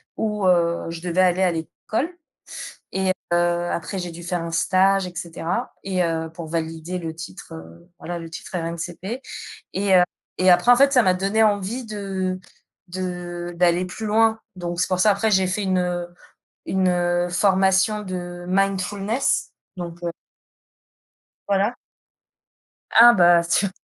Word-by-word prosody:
où 210 -2 -1
heu, 170 -1 +2
je 165 0 -6
devais 180 +1 +1
aller 185 0 +3
à 185 -2 +3
l'école 215 - -3 0.8
et 190 -1 +1 0.2
heu, - - +4 0.3
après 190 +3 -3
j'ai 180 -1 -4
dû 170 +1 -10
faire 175 0 -2
un 165 - -5
stage 190 +3 +3
et 180 - -9
cetera 170 +7 -4
et 185 -2 0
heu 165 -1 -1
pour 165 0 -8
valider 165 +2 -3
le 165 -2 -5
titre, 160 - -9
heu, 80 - -12
voilà 175 0 -5
le 165 -1 -8
titre 160 - -9
RNCP 175 +8 -5 0.5
et 195 0 +2
heu 180 - +7 0.4
et 185 0 +5
après 175 +6 +5
en - - +6
fait 275 +2 +5
ça 255 -3 +6
m'a 185 -3 +3
donné 195 +4 +1
envie 210 +4 0
de 195 -3 -3 0.5
-de 175 -1 -5
d'aller 175 +1 +2
plus 220 +5 -7
loin. 220 +1 +3 0.2
Donc 175 -2 -5
c'est - - +2
pour 185 -1 0
ça 210 +1 +5
après 210 +3 0
j'ai 190 -2 +3
fait 190 +3 -1
une, 190 -1 +1
heu, 175 -1 -1 0.6
une, 190 -1 +1
heu, 175 0 +1
formation 190 +3 +3
de 175 -2 -6
mindfulness 195 +5 0 0.2
donc 175 -1 -7
heu 170 - -1 1.4
voilà. 200 +4 +1 1.2
Ah 240 +1 +10
bah, 175 -3 +5
tiens, 180 +3 +1
185 Hz, 160 wpm, -23 LUFS, 175-195 Hz, 1.4 s, Ah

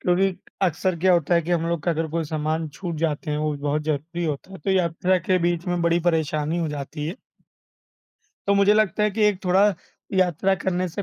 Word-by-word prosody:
क्योंकि 185 +1 +2 0.3
अक्सर 185 0 +1
क्या 185 +2 +4
होता 175 0 +2
है 170 - +3
कि 170 - -5
हम 165 -1 +1
लोग 170 -3 -1
का 175 - +1
अगर 165 0 -1
कोई 165 +1 -1
सामान 155 +1 -2
छूट 170 +3 -6
जाते 155 -1 -1
हैं, 150 - -1
वो 155 0 0
भी 145 - -5
बहुत 150 +1 0
ज़रूरी 155 +3 -2
होता 155 +4 -4
है, 190 - -8
तो 195 - -2
यात्रा 185 0 +2
के 185 +1 +1
बीच 175 0 0
में 175 -1 0
बड़ी 170 0 +2
परेशानी 160 -1 0
हो 165 -2 -1
जाती 150 +1 -5
है। 170 - -4 1.3
तो 200 - +4
मुझे 200 +1 +5
लगता 210 -1 +2
है 210 - +3
कि 215 +2 -1
एक 205 -3 +1
थोड़ा 185 +2 +4 0.5
यात्रा 185 +1 +2
करने 185 -1 -1
से 175 +4 -4
170 Hz, 225 wpm, -24 LUFS, 155-185 Hz, 1.3 s, मुझे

